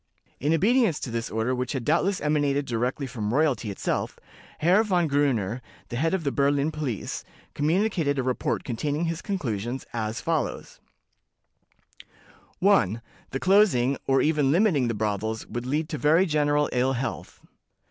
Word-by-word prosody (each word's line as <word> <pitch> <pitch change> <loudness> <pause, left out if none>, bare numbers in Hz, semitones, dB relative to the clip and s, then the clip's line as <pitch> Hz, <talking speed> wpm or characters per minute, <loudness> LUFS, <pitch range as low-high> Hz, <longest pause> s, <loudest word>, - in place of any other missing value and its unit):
In 145 +4 0
obedience 205 - +3
to 125 - -4
this 115 0 -3
order, 110 +3 -1
which 125 +1 -2
had 130 -4 -3
doubtless 180 +5 +2
emanated 145 -2 +1
direct 125 +4 -2
from 110 -4 -3
royalty 135 -5 +1
itself, 100 - -2 0.4
Herr 180 +7 +4
Von 180 -5 +1
Gruner, 130 -6 0 0.3
the - - -5
head 160 +8 +1
of 180 - -3
the 140 - 0
Berlin 140 +2 +1
police, 145 -9 -4 0.3
communicated 160 -2 +1
a 130 - 0
report 130 0 -1
containing 145 +7 -2
his 165 +1 -3
conclusions, 125 - -3
as 110 -1 -2
follows: 160 -5 -3 1.8
"1. 120 - +2 0.3
That 135 - -4
closing, 180 - +4
or 135 0 +3
even 150 -3 +2
limiting 165 - +3
the 115 - -1
brothels, 110 +1 -2
would 120 +1 -5
lead 150 +4 0
to 150 - -4
very 160 +8 +4
general 150 -2 +2
ill 130 +2 +2
health." 130 +1 -5
140 Hz, 150 wpm, -26 LUFS, 120-160 Hz, 1.8 s, Herr